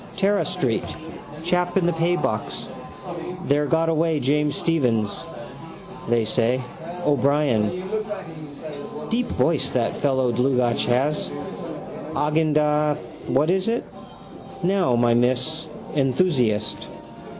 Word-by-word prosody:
Tara 200 +1 +3
street. 120 -5 0 0.6
Chap 180 +1 +1
in 185 - +3
the 175 - +3
paybox 170 +2 -1 0.8
there 145 +1 +2
got 165 +2 +2
away 160 -1 +2
James 145 +2 +1
Stephens, 120 -11 0 0.9
they 120 -1 +3
say. 120 +3 +2 0.5
O'Brien. 140 +1 +2 1.3
Deep 245 +2 +1
voice 160 -3 +1
that 120 -2 +1
fellow 130 -3 +1
Dlugacz 125 0 +2
has. 135 +5 +1 0.9
Agendath 150 -1 +2 0.3
what 150 +6 +3
is 190 +1 +1
it? 230 +1 +1 0.8
Now, 180 -8 +3
my 120 0 +4
miss. 130 +7 +1 0.3
Enthusiast. 125 - +1
150 Hz, 95 wpm, -23 LUFS, 125-165 Hz, 1.3 s, my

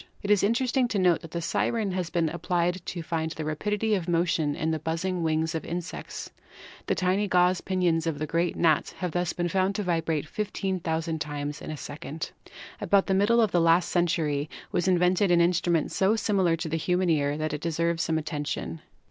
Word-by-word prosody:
It 200 - 0
is 205 - +5
interesting 245 +4 +2
to 220 - -2
note 180 -3 +3
that 165 - -10
the 170 +1 -4
siren 215 +4 0
has 180 -2 -2
been 170 -2 +1
ap 170 - -7
plied 175 +1 0
to 170 -2 -4
find 160 -1 -2
the 160 -1 -5
rapidity 210 +8 -1
of 185 -4 -1
motion 165 -3 +1
in 160 +1 -1
the 160 - -1
buzzing 175 +3 -2
wings 160 0 0
of 160 - -3
insects. 175 +1 -6 0.6
The - - +1
tiny 190 +3 +1
gauze 180 -1 +3
pinions 175 -4 +1
of 160 -3 -1
the 155 - -2 0.3
gnat 160 -3 +2
have 180 -2 -2
thus 175 +1 -1
been 175 -1 -1
found 190 +2 +1
to 210 - -1
vibrate 165 -4 -1
15,000 170 -5 -2
times 145 0 -4
in - - -7
a 155 - -4
second. 145 +2 -6 0.5
About 200 0 +3
the 195 - 0
middle 205 +5 +4
of 215 -4 +2
the 175 - +3
last 165 +1 +4
century 155 -4 0 0.2
was 175 +1 0
invented 180 +1 +3
an 175 -1 +5
instrument 170 -2 +2
so 195 +3 +2
similar 195 -6 +2
to 165 0 -4
the 160 +1 -1
human 180 +2 +1
ear 145 -2 +1
that 155 -1 -2
it 150 - -4
deserves 170 0 0
some 160 -1 0
attention. 150 0 -4
170 Hz, 200 wpm, -27 LUFS, 160-185 Hz, 0.6 s, is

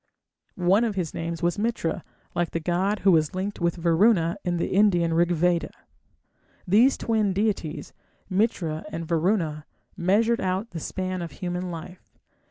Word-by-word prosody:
One 185 +5 +3
of 220 -4 -1
his 175 -5 -2
names 165 0 -4
was 175 +4 +1
Mitra, 220 -7 -1 0.3
like 175 -1 0
the 165 - -2
god 185 +5 0
who 195 - +5
was 155 -1 +2
linked 195 +1 -3
with 170 -1 +1
Varuna 170 +1 +3
in 175 -1 -1
the 170 - -1
Indian 180 -5 +3
Rigveda. 175 0 +2 1.0
These 225 +9 +5
twin 215 -4 0
deities, 185 -7 -2 0.3
Mitra 185 -6 0
and 165 0 -4
Varuna, 165 -3 0 0.3
measured 220 +6 +2
out 190 +4 -2
the 170 - -5
span 185 +2 -3
of 170 - -6
human 180 0 -4
life. 175 +2 -10
180 Hz, 150 wpm, -25 LUFS, 170-200 Hz, 1.0 s, who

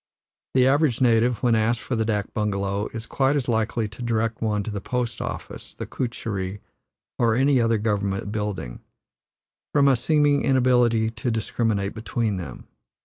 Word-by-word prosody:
The 130 -1 +5
average 140 -2 +3
native, 120 -2 +3
when 120 -2 +4
asked 115 +1 +2
for 130 - -3
the 110 - +1
dak 105 -2 -2
bungalow, 100 -1 -1
is 115 0 -6
quite 135 +3 +1
as 140 -3 -1
likely 110 -1 0
to 105 +4 -12
direct 115 -1 -1
one 105 -2 0
to 110 - -5
the 100 -1 -4
post 125 +1 -3
office, - - -7
the - - -5
kutcherry, 105 -6 -4 0.6
or 115 -2 +3
any 135 0 +3
other 115 -1 +2
government 100 -2 -1
building, 105 - -4 1.0
from 140 -1 +5
a 135 - +5
seeming 145 +3 +2
inability 125 -4 +3
to 110 +2 -3
discriminate 110 -2 -1
between 110 -2 -2
them. 75 -9 -8
115 Hz, 160 wpm, -24 LUFS, 105-125 Hz, 1.0 s, The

